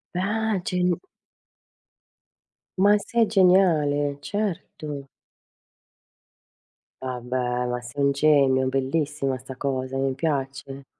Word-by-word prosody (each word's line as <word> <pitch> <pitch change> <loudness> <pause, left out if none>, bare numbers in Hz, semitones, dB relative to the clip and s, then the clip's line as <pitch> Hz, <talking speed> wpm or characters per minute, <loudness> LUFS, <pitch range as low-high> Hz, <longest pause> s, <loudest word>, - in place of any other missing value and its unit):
Ah 210 +2 0
gen 180 -1 +1 1.8
Ma 205 +2 +6
sei 230 +2 +1
geniale, 160 -8 +3
certo. 155 -7 -4 2.0
Vabbè, 125 -1 -2
ma 125 0 -2
sei 140 +4 -4
un 140 - +4
genio, 140 -2 +3
bellissima 135 0 -1
sta 130 +1 -10
cosa, 130 -1 -3
mi 135 0 0
piace. 140 -2 -3
140 Hz, 85 wpm, -24 LUFS, 130-180 Hz, 2.0 s, Ma